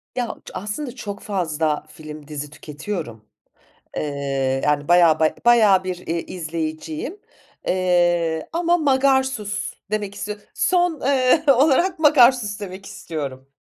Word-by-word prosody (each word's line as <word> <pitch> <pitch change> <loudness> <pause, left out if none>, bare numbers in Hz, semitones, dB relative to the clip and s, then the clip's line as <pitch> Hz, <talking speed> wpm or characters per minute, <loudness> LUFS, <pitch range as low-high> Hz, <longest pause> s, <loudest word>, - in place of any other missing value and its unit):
Ya 245 -2 -1 0.2
ç - - -10
aslında 210 +8 -5
çok 205 -4 -6
fazla 160 -7 -1
film, 155 -2 -11
dizi 150 -1 -6
tüketiyorum. 150 - -7 0.7
Iıı, 135 -2 -1
yani, 145 -1 +1
bayağı, 170 -2 +5
baya 160 -1 +2
bayağı 215 -6 +5
bir, 180 -1 -6
ııı, 170 - -1
izleyiciyim, 160 - -5 0.5
ııı, 175 -3 +2
ama 345 +1 +2
Magarsus 265 -8 +1 0.2
demek 205 -2 -2
istiyo 210 0 -5 0.2
son, 355 -1 +2
ııı, 275 +2 +3
olarak 310 +7 +3
Magarsus 250 -8 +4
demek 195 -1 -8
istiyorum. 140 -8 -6
185 Hz, 120 wpm, -22 LUFS, 155-250 Hz, 0.7 s, bayağı